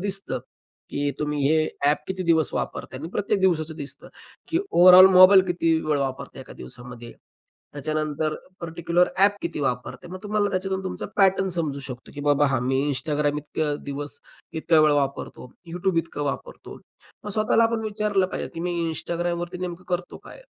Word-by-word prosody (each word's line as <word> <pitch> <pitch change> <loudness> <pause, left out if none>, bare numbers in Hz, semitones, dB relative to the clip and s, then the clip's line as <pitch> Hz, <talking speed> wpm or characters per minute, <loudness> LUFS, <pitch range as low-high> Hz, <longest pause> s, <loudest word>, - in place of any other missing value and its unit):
दिसतं, 195 0 -2 0.5
की 145 0 -1
तुम्ही 150 -1 -1
हे 155 0 +3 0.2
ॲप 145 +1 +3
किती 190 0 -3
दिवस 160 -2 +2
वापरताय 130 - -4
आणि 160 - -6
प्रत्येक 205 0 -1
दिवसाचं 160 -4 +1
दिसतं 140 -2 -8 0.4
की 330 - +1
ओव्हरऑल 180 +1 +9
मोबाईल 185 +1 +8
किती 170 -2 +1
वेळ 150 -2 +1
वापरताय 135 -1 -4
1 - - -13
दिवसामध्ये. 120 - -10 0.6
त्याच्यानंतर 155 +1 -2 0.3
पार्टिक्युलर 170 +1 +1
ॲप 200 +1 +4
किती 170 -3 -3
वापरते. 130 +6 -3
मग 185 +2 -7
तुम्हाला 210 -1 0
त्याच्यातून 190 0 -2
तुमचा 185 - -4
पॅटर्न 195 -1 +3
समजू 150 -4 -2
शकतो 130 -2 -8
की 145 - -6
बाबा 145 0 +3
हां, 135 -3 0
मी 130 +1 0
Instagram 145 +1 -1
इतके 150 0 -2
दिवस 145 +1 -6 0.4
इतका 160 0 +4
वेळ 155 -1 +5
वापरतो, 140 -3 -2 0.2
YouTube 180 0 0
इतकं 165 -2 -3
वापरतो. - - -6 0.5
मग 210 - -5
स्वतःला 215 +2 +3
आपण 225 0 0
विचारलं 210 -3 0
पाहिजे - - -5
की 165 - -5
मी 175 +1 -2 0.2
Instagramवरती 175 +2 -3
नेमकं 180 0 -5
करतो 180 0 -3
काय? - - -12
165 Hz, 165 wpm, -24 LUFS, 145-185 Hz, 0.6 s, ओव्हरऑल